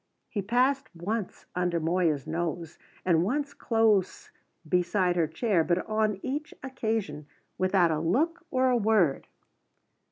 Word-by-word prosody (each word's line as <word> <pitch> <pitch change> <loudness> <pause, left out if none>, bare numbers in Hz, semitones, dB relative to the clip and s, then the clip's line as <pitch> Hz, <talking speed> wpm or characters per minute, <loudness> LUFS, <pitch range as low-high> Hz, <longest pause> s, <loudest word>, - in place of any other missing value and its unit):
He 205 - -2
passed 255 +6 +1
once 200 +4 -4
under 175 -1 0
Moya's 165 -4 +1
nose, 165 0 -4 0.3
and 170 -2 +3
once 280 +8 -1
close 220 -5 +1 0.4
beside 180 +2 +1
her 165 -2 +2
chair, 170 +2 +1
but 175 +2 0
on 215 -2 0
each 290 +3 -4
occasion 220 - -3 0.3
without 185 -2 +3
a 155 - 0
look 315 - 0
or 255 -1 +2
a 245 - +3
word. 205 -10 +2
190 Hz, 130 wpm, -28 LUFS, 170-235 Hz, 0.4 s, and